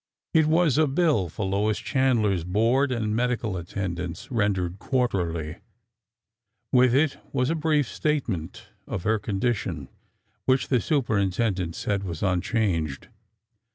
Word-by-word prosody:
It 160 Hz, -2 st, +4 dB
was 155 Hz, -3 st, +3 dB
a 155 Hz, -, +4 dB
bill 140 Hz, -, +2 dB
for 100 Hz, -, -4 dB
Lois 100 Hz, +2 st, +1 dB
Chandler's 115 Hz, -, +1 dB
board 115 Hz, +9 st, +2 dB
and 110 Hz, -3 st, -1 dB
medical 120 Hz, -4 st, 0 dB
at 85 Hz, -, -9 dB
tendance, 90 Hz, -2 st, -4 dB
rendered 95 Hz, -5 st, 0 dB
quarterly. 85 Hz, -, -1 dB, 1.1 s
With 125 Hz, -1 st, +5 dB
it 145 Hz, 0 st, +2 dB
was 130 Hz, +1 st, +1 dB
a -, -, +2 dB
brief 155 Hz, -4 st, +1 dB
state 150 Hz, +1 st, -1 dB
ment 85 Hz, -8 st, -5 dB, 0.2 s
of 85 Hz, -, -4 dB
her 110 Hz, 0 st, +2 dB
condition, 100 Hz, -, -2 dB, 0.6 s
which 130 Hz, 0 st, +2 dB
the 125 Hz, -4 st, +3 dB
superintendent 100 Hz, -, 0 dB
said 100 Hz, -1 st, -1 dB
was 85 Hz, -4 st, -5 dB
unchanged. 90 Hz, -, 0 dB
110 Hz, 130 wpm, -25 LUFS, 90-130 Hz, 1.1 s, With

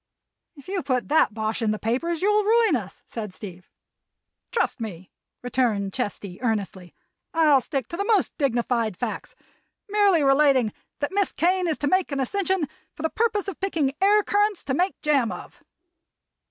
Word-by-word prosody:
"If 280 Hz, -, -15 dB
you 380 Hz, -1 st, -2 dB
put 255 Hz, -2 st, -1 dB
that 295 Hz, -8 st, +3 dB
bosh 220 Hz, +1 st, -2 dB
in 225 Hz, -, +1 dB
the 215 Hz, -, 0 dB
papers 310 Hz, -, -1 dB
you'll 420 Hz, +1 st, +3 dB
ruin 445 Hz, -4 st, +4 dB
us," 200 Hz, -6 st, -6 dB
said 210 Hz, -5 st, -6 dB
Steve. 185 Hz, -3 st, -10 dB, 0.8 s
"Trust 460 Hz, -, 0 dB
me," 190 Hz, -5 st, -7 dB, 0.3 s
returned 225 Hz, -6 st, 0 dB
Chesty, 205 Hz, -6 st, -4 dB
earnestly. 200 Hz, -6 st, -3 dB, 0.4 s
"I'll 305 Hz, -5 st, +5 dB
stick 265 Hz, -1 st, -3 dB
to 340 Hz, -, -5 dB
the 400 Hz, -, -1 dB
most 425 Hz, -4 st, +2 dB
dignified 235 Hz, -, 0 dB
facts, -, -, -5 dB, 0.5 s
merely 400 Hz, -6 st, +3 dB
relating 275 Hz, -5 st, +4 dB, 0.3 s
that 285 Hz, -, -1 dB
Miss 400 Hz, -1 st, +1 dB
Kane 365 Hz, +1 st, +1 dB
is 315 Hz, -, 0 dB
to 290 Hz, -, -1 dB
make 370 Hz, +1 st, +2 dB
an 280 Hz, -, -2 dB
ascension 375 Hz, +4 st, 0 dB, 0.3 s
for 305 Hz, -, -8 dB
the 320 Hz, -, 0 dB
purpose 430 Hz, -3 st, 0 dB
of 390 Hz, -, -5 dB
picking 320 Hz, -8 st, 0 dB
air 415 Hz, +2 st, +5 dB
currants 415 Hz, -1 st, +1 dB
to 265 Hz, -, -2 dB
make 360 Hz, +7 st, 0 dB
jam 280 Hz, -6 st, +2 dB
of." -, -, -10 dB
285 Hz, 165 wpm, -24 LUFS, 225-380 Hz, 0.8 s, I'll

